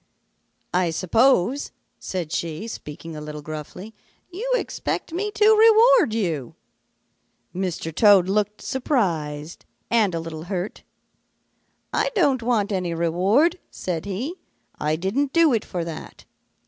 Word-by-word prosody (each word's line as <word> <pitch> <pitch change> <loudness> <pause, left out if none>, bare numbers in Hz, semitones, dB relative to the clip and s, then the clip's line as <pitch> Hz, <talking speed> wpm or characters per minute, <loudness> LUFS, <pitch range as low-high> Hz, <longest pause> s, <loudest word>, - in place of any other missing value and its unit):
"'I 180 -1 +2
suppose,' 225 - +2 0.3
said 175 -5 -4
she, 170 +3 -3
speaking 165 -5 -8
a 150 - -7
little 150 0 -7
gruffly, 155 +8 -8 0.4
'you 450 +8 -4
expect 410 - -3
me 405 +5 -1
to 435 +1 +6
reward 450 - +6
you.' 170 - -2 1.0
"Mr. 180 -3 -3
Toad 200 -1 +6
looked 210 +1 -1
surprised 165 - -2 0.3
and 215 -6 +3
a - - -1
little 165 -1 -7
hurt. 185 +1 -4 1.1
'I - - +1
don't 280 - +3
want 225 -4 0
any 180 -3 -1
reward,' 195 - +2
said 170 -2 -4
he. 210 - -3 0.5
'I 155 +1 0
didn't 235 - -1
do 330 -4 +5
it 225 - +1
for 175 -2 -4
that. 165 -2 -9
195 Hz, 125 wpm, -23 LUFS, 165-265 Hz, 1.1 s, to